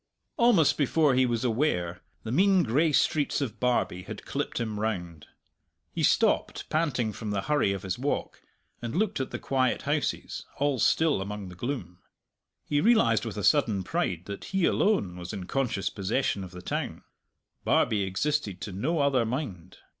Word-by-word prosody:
Almost 225 - +4
before 150 0 +3
he 130 0 +3
was 120 0 -1
aware, 110 - 0 0.2
the 110 - -4
mean 190 +5 +4
gray 145 +7 +2
streets 150 0 +2
of 115 -7 -4
Barbie 120 -7 0
had - - -9
clipped - - -3
him 110 -3 -3
round. 90 -8 -3 0.6
He - - -3
stopped, - - +2
panting 130 -9 0
from 110 0 -6
the 100 -2 -1
hurry 145 -7 +2
of 100 -2 -4
his 95 +3 -3
walk, 140 +3 -2 0.4
and 120 +2 -4
looked 205 -2 0
at 130 - -2
the - - -4
quiet 130 -2 0
houses, - - -2
all 140 -2 +1
still 155 -1 +3
among 100 -1 -5
the 90 - -11
gloom. 90 -5 -5 0.7
He 145 0 +1
realized 160 - +4
with 110 -2 -5
a 105 - -3
sudden 105 -5 +3
pride 90 -1 -2
that 100 0 -7
he 190 -3 0
alone 185 - +1
was 90 0 -7
in 95 - -5
conscious 110 -4 -1
possession 100 +1 -1
of 95 - -7
the 90 0 -11
town. - - -3 0.6
Barbie 105 -2 +2
existed 100 +1 -1
to 105 - -5
no 145 - -1
other 140 -4 +3
mind. 110 - -5
115 Hz, 170 wpm, -28 LUFS, 95-145 Hz, 0.7 s, Almost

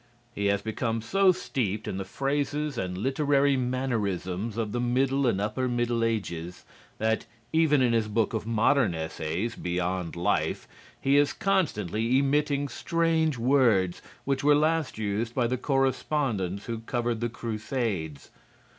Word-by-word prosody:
He 100 -2 -1
has 100 0 +1
become 115 +1 -2
so 195 +10 +4
steeped 110 - -2
in 95 - -3
the 95 - -2
phrases 145 +5 -1
and 90 -5 -3
literary 140 +4 +2
mannerisms 115 -6 -2
of 110 -3 -1
the 120 - -2
middle 130 +2 +1
and 100 -5 +1
upper 110 +5 -1
middle 120 -1 0
ages 90 -6 -3 0.3
that, 110 0 0 0.3
even 155 -4 +4
in 120 -2 +3
his 115 -2 +2
book 110 0 0
of 110 -1 -3
modern 115 -3 +3
essays 80 +6 -3
"Beyond 90 0 -2
Life," 85 +1 0 0.3
he 140 +1 +3
is 145 0 +3
constantly 120 - +1
emitting 145 +1 +1
strange 160 +2 0
words 115 -8 +3 0.2
which 135 -1 0
were 145 0 +6
last 155 -2 +1
used 110 +2 -2
by 125 - +2
the 125 +2 0
correspondents 130 - 0
who 115 -1 -4
covered 120 0 -2
the 120 - 0
crusades. 110 - -3
120 Hz, 145 wpm, -27 LUFS, 105-140 Hz, 0.3 s, were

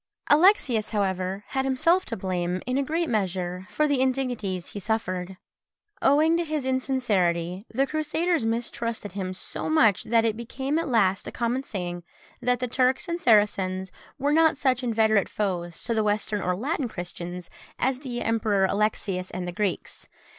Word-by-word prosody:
Alexius, 295 - +4
however, 190 -1 -1
had 265 -1 0
himself 330 +8 +2
to 230 - -4
blame, 180 -1 -2
in 255 - -1
a 275 - +2
great 325 +5 -1
measure, 185 - -2
for 305 - +1
the 280 -3 +1
indignities 245 -9 -1
he 205 - -5
suffered: 185 -3 -2 0.6
owing 310 +4 +4
to 340 - +1
his 305 -4 -2
insincerity, 195 -10 0
the 265 +4 +2
Crusaders 310 +1 0
mistrusted 230 -1 -2
him 185 -1 -4
so 185 - -4
much, 230 -11 +4
that 230 0 +3
it 220 -2 +1
became 265 +6 -2
at 330 - -2
last 200 -7 +2
a - - -4
common 240 +2 -1
saying, 175 -8 -5 0.4
that 250 0 +2
the 250 - -1
Turks 255 +2 +1
and 340 0 -3
Saracens 190 -4 +2 0.3
were 285 +2 +1
not 320 -2 +4
such 260 -3 +1
inveterate 220 -4 +2
foes 175 -5 -3
to 235 - 0
the 220 -1 +1
Western 210 0 0
or 180 0 0
Latin 270 - -2
Christians 175 -3 -7 0.3
as 260 0 0
the 250 -4 -4
Emperor 215 -3 +2
Alexius 195 -2 -1
and 180 -1 -5
the - - -3
Greeks. 195 0 -3
225 Hz, 165 wpm, -26 LUFS, 190-265 Hz, 0.6 s, Alexius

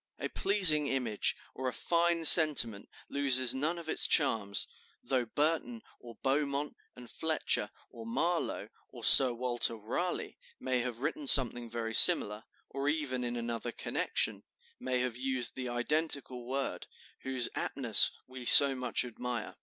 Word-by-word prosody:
A - - -6
pleasing 165 -8 +3
image, 125 -7 -2 0.2
or 130 - -6
a 125 - -4
fine 170 -1 -1
sentiment 145 - +6 0.2
loses 130 -3 +1
none 155 +6 -3
of 170 -2 -10
its - - +1
charms, 105 -9 0 0.4
though 130 -2 -2
Burton, 165 - -3 0.2
or 120 -1 -14
Beaumont 140 +1 -2 0.2
and 125 -1 -13
Fletcher, 160 +5 -2 0.2
or 115 -1 -11
Marlowe, 170 +9 -3 0.2
or - - -14
Sir 130 -2 +5
Walter 120 -1 -1
Raleigh, 115 - -5 0.2
may 130 -1 -2
have 120 -1 -5
written 280 - -4
something 120 - +4
very 115 -1 -6
similar, 105 0 +5 0.2
or 140 +2 -4
even 145 -5 -3
in 120 0 -5
another 120 0 -5
connection, - - -3 0.4
may 130 -1 -3
have 125 -2 -4
used 130 -1 -2
the 130 -1 -7
identical 125 -1 -3
word, 135 +1 -5 0.3
whose 130 -2 -3
aptness 120 -6 +2 0.2
we 130 0 -12
so 140 +3 +8
much 125 -1 -3
admire. 125 -1 -7
130 Hz, 145 wpm, -30 LUFS, 120-150 Hz, 0.4 s, so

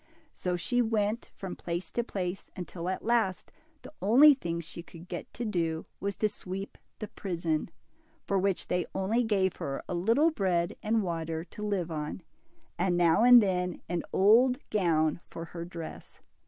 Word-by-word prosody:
So 180 -1 -2
she 245 +8 +1
went 220 -1 0
54 - - -23
DIMPLE. - - -33
from 190 -2 -5
place 175 +1 -4
to 240 - 0
place, 185 -4 -4
until 180 -1 -5
at 185 - -3
last 225 -6 +1 0.3
the - - -11
only 260 +10 +8
thing 170 -11 -3
she 170 +1 -8
could 170 0 -13
get 175 - -6
to 240 - -3
do, 165 -6 -1
was 200 0 -2
to 215 - +1
sweep 195 -1 -7 0.2
the 215 - -5
prison, 170 -5 -2 0.6
for 195 - +1
which 195 -1 0
they 180 -1 0
only 210 +6 +1
gave 195 -5 +1
her 135 -1 -4
a - - -3
little 230 - +3
bread 180 - 0
and 220 0 +1
water 165 -2 -3
to 185 +4 -12
live 195 -5 -1
on, 150 +3 -4 0.6
and 175 0 +2
now 175 +4 +4
and 245 -2 +9
then 180 -3 -1
an 175 -1 -1
old 240 +6 +5
gown 165 -6 +2
for 165 - -7
her 170 0 -7
dress. 170 -2 -9
185 Hz, 180 wpm, -29 LUFS, 170-215 Hz, 0.6 s, and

